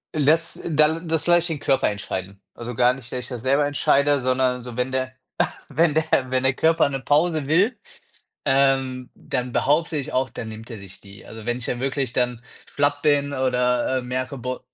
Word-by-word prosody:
Les 155 Hz, +2 st, +2 dB
da 155 Hz, +1 st, +3 dB
das 165 Hz, -2 st, -2 dB
lasse 175 Hz, 0 st, +5 dB
ich 175 Hz, -, -2 dB
den 160 Hz, -4 st, -3 dB
Körper 135 Hz, -5 st, +2 dB
entscheiden. 100 Hz, -1 st, -5 dB
Also, 120 Hz, 0 st, -7 dB
gar 125 Hz, +2 st, +4 dB
nicht, 125 Hz, -3 st, -12 dB
dass 125 Hz, -, -3 dB
ich 125 Hz, -, -8 dB
das 125 Hz, -3 st, -6 dB
selber 140 Hz, +3 st, +2 dB
entscheide, 145 Hz, -1 st, +2 dB
sondern 130 Hz, 0 st, +1 dB
so, 120 Hz, -1 st, -9 dB
wenn 125 Hz, +1 st, 0 dB
der 130 Hz, 0 st, -2 dB, 0.6 s
wenn 160 Hz, -2 st, +2 dB
der 160 Hz, -, +3 dB, 0.3 s
wenn 130 Hz, 0 st, 0 dB
der 130 Hz, 0 st, +3 dB
Körper 160 Hz, +3 st, +3 dB
'ne 135 Hz, -1 st, -3 dB
Pause 150 Hz, +2 st, +1 dB
will, 200 Hz, -, +2 dB, 0.7 s
ähm, 135 Hz, -2 st, +1 dB
dann 125 Hz, 0 st, -4 dB
behaupte 155 Hz, +3 st, +1 dB
ich 145 Hz, +2 st, -5 dB
auch, 130 Hz, +1 st, +1 dB
dann 115 Hz, -, -7 dB
nimmt 110 Hz, +2 st, -10 dB
er 115 Hz, -, -7 dB
sich 100 Hz, -1 st, -12 dB
die. 100 Hz, -1 st, -14 dB
Also, 110 Hz, -1 st, -10 dB
wenn 120 Hz, 0 st, 0 dB
ich 125 Hz, -, -6 dB
ja 120 Hz, -, -2 dB
wirklich 135 Hz, -1 st, -2 dB
dann 125 Hz, -1 st, -1 dB, 0.3 s
schlapp 145 Hz, 0 st, +1 dB
bin 145 Hz, -1 st, +2 dB
oder, 125 Hz, -1 st, +1 dB
äh, -, -, -5 dB
merke, 130 Hz, +2 st, -3 dB
bo 125 Hz, 0 st, -4 dB
130 Hz, 205 wpm, -23 LUFS, 125-145 Hz, 0.7 s, lasse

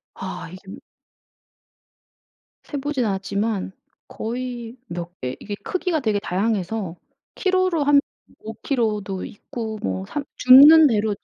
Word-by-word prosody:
아 180 Hz, -3 st, -7 dB
이게 185 Hz, -, -11 dB, 2.0 s
세 290 Hz, -, -6 dB
보진 275 Hz, -2 st, -1 dB
않았지만 200 Hz, 0 st, -2 dB, 0.4 s
거의 240 Hz, +1 st, -5 dB
몇 175 Hz, -1 st, -7 dB
개 125 Hz, 0 st, -3 dB
이게 205 Hz, -, -6 dB
크기가 365 Hz, -3 st, -1 dB
되게 215 Hz, -6 st, 0 dB
다양해서 200 Hz, -1 st, -2 dB, 0.4 s
킬로로 370 Hz, -4 st, +1 dB
한 285 Hz, 0 st, +6 dB, 0.4 s
5 220 Hz, -, -8 dB
킬로도 215 Hz, -5 st, -2 dB
있고 220 Hz, +1 st, -7 dB
뭐 95 Hz, 0 st, -2 dB
삼 290 Hz, -, -4 dB
줍는 295 Hz, +5 st, +9 dB
대로 215 Hz, -3 st, +1 dB
220 Hz, 215 characters per minute, -22 LUFS, 190-270 Hz, 2.0 s, 줍는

